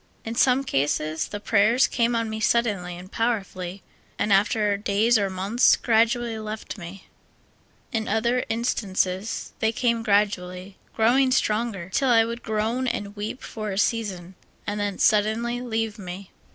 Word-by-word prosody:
In 225 Hz, -, -3 dB
some 255 Hz, +2 st, +3 dB
cases, 155 Hz, -, -1 dB
the 205 Hz, -, -6 dB
prayers 220 Hz, +5 st, +3 dB
came 235 Hz, -1 st, +1 dB
on 230 Hz, -1 st, 0 dB
me 220 Hz, 0 st, -4 dB
suddenly 205 Hz, -6 st, 0 dB
and 185 Hz, +2 st, -11 dB
powerfully, 195 Hz, -5 st, -2 dB, 0.3 s
and, 210 Hz, -, +1 dB
after 205 Hz, +1 st, +2 dB
clays 210 Hz, +4 st, +2 dB
or 200 Hz, -1 st, 0 dB
months, 195 Hz, +6 st, +3 dB
gradually 230 Hz, 0 st, +1 dB
left 215 Hz, 0 st, -6 dB
me; 185 Hz, 0 st, -10 dB, 0.9 s
in 225 Hz, -3 st, -2 dB
other 235 Hz, +4 st, +1 dB
instances, 205 Hz, -3 st, -1 dB
they 220 Hz, -, +2 dB
came 235 Hz, 0 st, 0 dB
gradually, 195 Hz, -3 st, -1 dB, 0.2 s
getting 255 Hz, +4 st, +4 dB
stronger, 215 Hz, -6 st, 0 dB
till 270 Hz, -, +2 dB
I 225 Hz, -2 st, +5 dB
would 235 Hz, +1 st, -5 dB
groan 220 Hz, +4 st, -1 dB
and 205 Hz, -4 st, -3 dB
w^eep 210 Hz, +4 st, -5 dB
for 215 Hz, -1 st, -6 dB
a 195 Hz, -, -4 dB
season, 195 Hz, -5 st, -1 dB, 0.3 s
and 205 Hz, +1 st, -3 dB
then 205 Hz, -2 st, -2 dB
suddenly 220 Hz, +3 st, +2 dB
leave 225 Hz, -2 st, -2 dB
me. 185 Hz, 0 st, -8 dB
215 Hz, 150 wpm, -24 LUFS, 195-235 Hz, 0.9 s, I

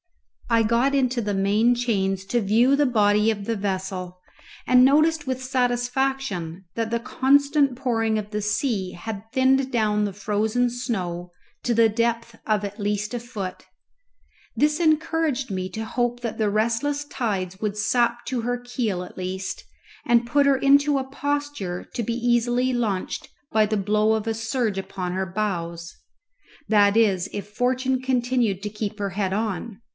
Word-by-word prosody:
I 230 Hz, -1 st, +4 dB
got 235 Hz, +5 st, +2 dB
into 255 Hz, -3 st, +1 dB
the 205 Hz, -2 st, -2 dB
main 210 Hz, +5 st, +3 dB
chains 195 Hz, -6 st, -1 dB
to 240 Hz, +4 st, 0 dB
view 230 Hz, +7 st, +4 dB
the 290 Hz, 0 st, +3 dB
body 210 Hz, -2 st, +3 dB
of 205 Hz, -2 st, -5 dB
the 230 Hz, -, -1 dB
vessel, 190 Hz, -2 st, -4 dB, 0.5 s
and 250 Hz, 0 st, +6 dB
noticed 305 Hz, +3 st, +4 dB
with 260 Hz, -1 st, -3 dB
satisfaction 245 Hz, -7 st, -1 dB
that 230 Hz, -1 st, -1 dB
the 235 Hz, 0 st, 0 dB
constant 280 Hz, +2 st, +2 dB
pouring 225 Hz, -4 st, 0 dB
of 210 Hz, -1 st, -5 dB
the 210 Hz, -1 st, -2 dB
sea 210 Hz, -2 st, -1 dB
had 220 Hz, +3 st, -7 dB
thinned 265 Hz, +1 st, +2 dB
down 210 Hz, -3 st, +1 dB
the 205 Hz, -, -1 dB
frozen 215 Hz, +5 st, 0 dB
snow 180 Hz, -8 st, -4 dB, 0.3 s
to 240 Hz, -, +1 dB
the 230 Hz, 0 st, +5 dB
depth 230 Hz, +1 st, -1 dB
of 210 Hz, -2 st, +1 dB
at 205 Hz, +2 st, -7 dB
least 210 Hz, +2 st, -1 dB
a 240 Hz, -, -2 dB
foot. 215 Hz, -6 st, -6 dB, 0.9 s
This 300 Hz, +2 st, +2 dB
encouraged 315 Hz, -5 st, +1 dB
me 185 Hz, -1 st, -3 dB
to 220 Hz, +4 st, -5 dB
hope 240 Hz, +1 st, -1 dB
that 230 Hz, -2 st, -4 dB
the 215 Hz, -1 st, +2 dB
restless 235 Hz, +8 st, 0 dB
tides 195 Hz, -9 st, -3 dB
would 210 Hz, -1 st, -2 dB
sap 235 Hz, +2 st, +1 dB
to 255 Hz, -2 st, -2 dB
her 245 Hz, +2 st, -1 dB
keel 240 Hz, -6 st, -3 dB
at 180 Hz, -, -12 dB
least, 185 Hz, +1 st, -4 dB, 0.4 s
and 235 Hz, 0 st, +3 dB
put 285 Hz, +4 st, +3 dB
her 275 Hz, -1 st, +4 dB
into 280 Hz, +1 st, +4 dB
a 265 Hz, -, -2 dB
posture 285 Hz, -9 st, -3 dB
to 240 Hz, -, -2 dB
be 230 Hz, +2 st, -2 dB
easily 240 Hz, +1 st, +1 dB
launched 215 Hz, -6 st, -2 dB, 0.2 s
by 215 Hz, -1 st, +4 dB
the 215 Hz, 0 st, 0 dB
blow 210 Hz, +2 st, +2 dB
of 220 Hz, -1 st, -1 dB
a 225 Hz, -, +1 dB
surge 225 Hz, -2 st, -1 dB
upon 185 Hz, -2 st, -4 dB
her 190 Hz, +1 st, -2 dB
bows 170 Hz, -4 st, -3 dB, 0.7 s
that 205 Hz, -1 st, +4 dB
is 195 Hz, -5 st, +2 dB
if 205 Hz, -, -5 dB
fortune 255 Hz, +4 st, 0 dB
continued 245 Hz, -6 st, 0 dB
to 210 Hz, -, -2 dB
keep 210 Hz, 0 st, -5 dB
her 200 Hz, -1 st, -2 dB
head 190 Hz, 0 st, -1 dB
on. 210 Hz, 0 st, -3 dB
225 Hz, 165 wpm, -24 LUFS, 205-250 Hz, 0.9 s, and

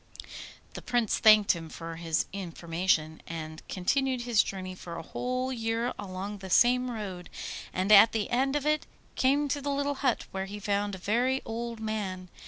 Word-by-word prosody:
The -, -, -7 dB
Prince 240 Hz, -4 st, 0 dB
thanked 215 Hz, -2 st, +7 dB
him 165 Hz, -2 st, -4 dB
for 165 Hz, +1 st, -7 dB
his 165 Hz, -1 st, 0 dB
information, 170 Hz, -3 st, -1 dB
and 155 Hz, -1 st, -6 dB
continued 260 Hz, +7 st, 0 dB
his 240 Hz, -3 st, +3 dB
journey 185 Hz, -1 st, -5 dB
for 175 Hz, -2 st, -8 dB
a 165 Hz, -, -6 dB
whole 255 Hz, +7 st, -2 dB
year 230 Hz, +1 st, -1 dB
along 200 Hz, +1 st, -5 dB
the 190 Hz, 0 st, -8 dB
same 250 Hz, +5 st, +4 dB
road, 195 Hz, -6 st, -6 dB, 0.4 s
and 185 Hz, +3 st, 0 dB
at 210 Hz, +2 st, +9 dB
the 220 Hz, -2 st, -2 dB
end 265 Hz, +3 st, +2 dB
of 295 Hz, -1 st, -1 dB
it 305 Hz, 0 st, +1 dB, 0.3 s
came 280 Hz, +3 st, +2 dB
to 285 Hz, +1 st, -1 dB
the 285 Hz, -, -3 dB
little 285 Hz, 0 st, 0 dB
hut, 260 Hz, -4 st, +1 dB
where 190 Hz, 0 st, -3 dB
he 205 Hz, +2 st, -7 dB
found 205 Hz, 0 st, -1 dB
a -, -, -7 dB
very 245 Hz, +8 st, +1 dB
old 230 Hz, 0 st, -4 dB
man. 200 Hz, -4 st, -4 dB
210 Hz, 180 wpm, -29 LUFS, 185-250 Hz, 0.4 s, at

